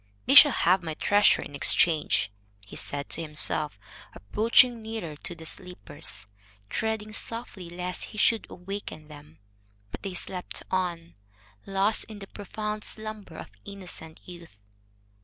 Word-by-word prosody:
"They 270 - +3
shall 285 +1 +11
have 185 -4 +3
my 160 -2 -4
treasure 205 +5 +4
in - - -10
exchange," 150 -4 +3 0.3
he 105 - -11
said 140 0 0
to - - -2
himself, 150 -4 0 0.4
approaching 230 - +4
nearer 220 -8 -5
to 175 - -7
the 160 - -11
sleepers, 180 - -5 0.5
treading 220 -1 -2
softly 225 -7 -3
lest 180 +1 -4
he 215 - -11
should 225 +1 +3
awaken 180 -4 -7
them. 150 +1 -13 0.5
But - - -7
they 195 -2 -5
slept 180 0 -3
on, 175 -3 -1 0.5
lost 195 +2 +1
in 215 - -10
the 200 - -8
profound 210 +2 -5
slumber 215 -6 -7
of - - -9
innocent 180 -5 -8
youth. 170 - -11
185 Hz, 140 wpm, -28 LUFS, 160-215 Hz, 0.5 s, shall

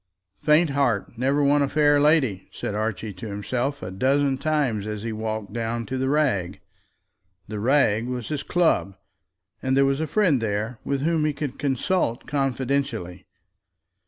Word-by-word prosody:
"Faint 155 +1 +4
heart 125 -7 0
never 135 +4 +1
won 145 +1 +4
a 140 - +1
fair 145 -1 +4
lady," 140 - +2
said - - -4
Archie 110 0 -3
to 95 +5 -8
himself 120 +6 -3
a 90 - -5
dozen 135 +7 +2
times, 135 -8 0
as 105 -1 -5
he 115 -1 -3
walked 110 -1 -4
down 115 0 -2
to 130 - -4
the 130 0 0
Rag. 130 - 0 0.9
The 105 -1 -5
Rag 115 -2 +2
was 125 -2 -4
his 150 -2 -2
club, 160 - +1 0.7
and 130 0 +1
there 140 - +5
was 135 +1 +1
a 160 - -1
friend 165 - +2
there 110 +2 -2
whom 155 +3 0
he 155 - +1
could 140 -2 -5
consult 140 -1 0
confidentially. 130 -9 -2
130 Hz, 160 wpm, -24 LUFS, 110-145 Hz, 0.9 s, there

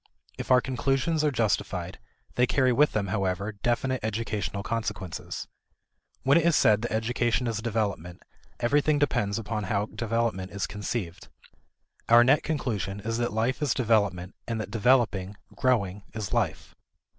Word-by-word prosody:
If - - -7
our 125 -1 +6
conclusions 135 +5 0
are 150 - +3
justified, 115 -7 -1 0.3
they 125 0 +2
carry 130 -1 +3
with 150 +5 +3
them, 100 -2 -1
however, 100 0 -1
definite 120 +5 -1
educational 105 -2 -3
consequences. 105 -6 -4 0.8
When 140 +5 +5
it 165 - -1
is 170 - +4
said 105 -1 +4
that 120 - -3
education 120 +2 0
is 115 -3 -1
development, 105 -6 -3 0.4
everything 145 +5 +2
depends 120 -8 0
upon 110 -2 -3
how 100 +1 0
development 115 -5 -2
is 100 - -2
conceived. 100 -3 -5 0.8
Our 120 +1 +8
net 135 +5 +4
conclusion 105 - -2
is 115 +2 -2
that 120 0 0
life 115 +6 -1
is 145 -6 +1
development, 100 -7 +1
and 115 -2 -2
that 110 - -5
developing, 110 -4 +2 0.2
growing, 105 -7 +1
is 105 -4 -4
life. - - -1
115 Hz, 145 wpm, -27 LUFS, 100-125 Hz, 0.8 s, Our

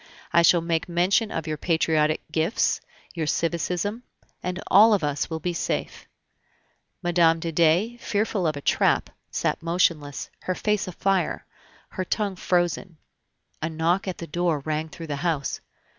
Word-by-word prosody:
I 170 - +6
shall 170 0 +5
make 165 0 -1
mention 185 +6 +2
of 160 - -3
your 155 -1 -3
patriotic 160 -1 +1
gifts, 160 +7 +1 0.3
your 160 -3 -2
civism, 175 +7 -1 0.4
and 180 0 -3
all 215 +3 +7
of 195 - -2
us 145 -1 -1
will 160 -1 -3
be 175 +2 -2
safe." - - -3 1.0
Mme. 170 -2 +4
de 165 0 -4
Dey, 170 +9 +3
fearful 205 -5 -1
of 155 -2 -1
a - - -6
trap, - - +2 0.2
sat - - -1
motionless, 165 -4 0
her 185 - 0
face 210 0 0
afire, 185 -1 0 0.4
her 185 - -3
tongue 200 +1 -1
frozen. 175 -1 0 0.6
A 155 - -1
knock 165 +5 0
at 185 - -3
the 170 - -6
door 165 -2 0
rang 155 +2 -2
through 165 +1 -8
the 145 -2 -3
house. 155 -3 -1
170 Hz, 155 wpm, -25 LUFS, 160-185 Hz, 1.0 s, all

